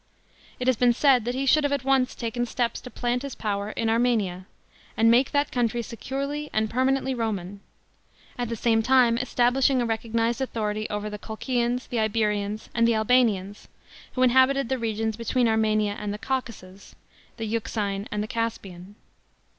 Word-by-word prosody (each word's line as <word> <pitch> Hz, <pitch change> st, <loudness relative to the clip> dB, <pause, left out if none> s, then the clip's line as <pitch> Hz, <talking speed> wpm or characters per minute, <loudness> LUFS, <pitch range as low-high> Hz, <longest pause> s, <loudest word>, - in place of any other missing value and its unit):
It 250 Hz, -, -3 dB
has 255 Hz, -1 st, +3 dB
been 245 Hz, 0 st, +4 dB
said 255 Hz, -2 st, +3 dB
that 245 Hz, +1 st, -2 dB
he 270 Hz, +1 st, -1 dB
should 300 Hz, +3 st, +4 dB
have 285 Hz, -, 0 dB
at 280 Hz, -2 st, -1 dB
once 265 Hz, -1 st, +2 dB
taken 240 Hz, +1 st, -3 dB
steps 235 Hz, 0 st, -2 dB
to 250 Hz, -, -9 dB
plant 245 Hz, 0 st, -2 dB
his 280 Hz, -2 st, -6 dB
power 205 Hz, -1 st, -2 dB
in 225 Hz, +1 st, -2 dB
Armenia, 220 Hz, -6 st, 0 dB, 0.5 s
and 225 Hz, +1 st, +5 dB
make 250 Hz, +3 st, +4 dB
that 285 Hz, -1 st, 0 dB
country 240 Hz, -1 st, 0 dB
securely 280 Hz, +6 st, -4 dB
and 215 Hz, 0 st, 0 dB
permanently 265 Hz, +1 st, +1 dB
Roman, 205 Hz, -5 st, -3 dB, 0.8 s
at 245 Hz, -2 st, -3 dB
the 230 Hz, -, -2 dB
same 225 Hz, 0 st, +2 dB
time 250 Hz, -1 st, +4 dB
establishing 255 Hz, +1 st, +2 dB
a 240 Hz, -, +1 dB
recognised 230 Hz, +1 st, -1 dB
authority 215 Hz, -4 st, -2 dB
over 210 Hz, 0 st, -3 dB
the 210 Hz, 0 st, -6 dB
Colchiaus, 240 Hz, +3 st, -2 dB
the 240 Hz, -, -3 dB
Iberians, 210 Hz, -1 st, -1 dB
and 230 Hz, -1 st, +3 dB
the 235 Hz, -, +3 dB
Albanians, 220 Hz, -4 st, +1 dB, 0.5 s
who 255 Hz, -, +1 dB
inhabited 260 Hz, +1 st, +4 dB
the 265 Hz, -1 st, -1 dB
regions 220 Hz, -1 st, -2 dB
between 235 Hz, +1 st, +1 dB
Armenia 215 Hz, -2 st, +1 dB
and 210 Hz, -, -3 dB
the 205 Hz, -, -4 dB
Caucasus, 210 Hz, -7 st, -5 dB, 0.4 s
the 225 Hz, -, -4 dB
Euxine 210 Hz, -2 st, -2 dB
and 210 Hz, 0 st, -1 dB
the -, -, -5 dB
Caspian. 205 Hz, -5 st, -5 dB
230 Hz, 170 wpm, -25 LUFS, 215-255 Hz, 0.8 s, and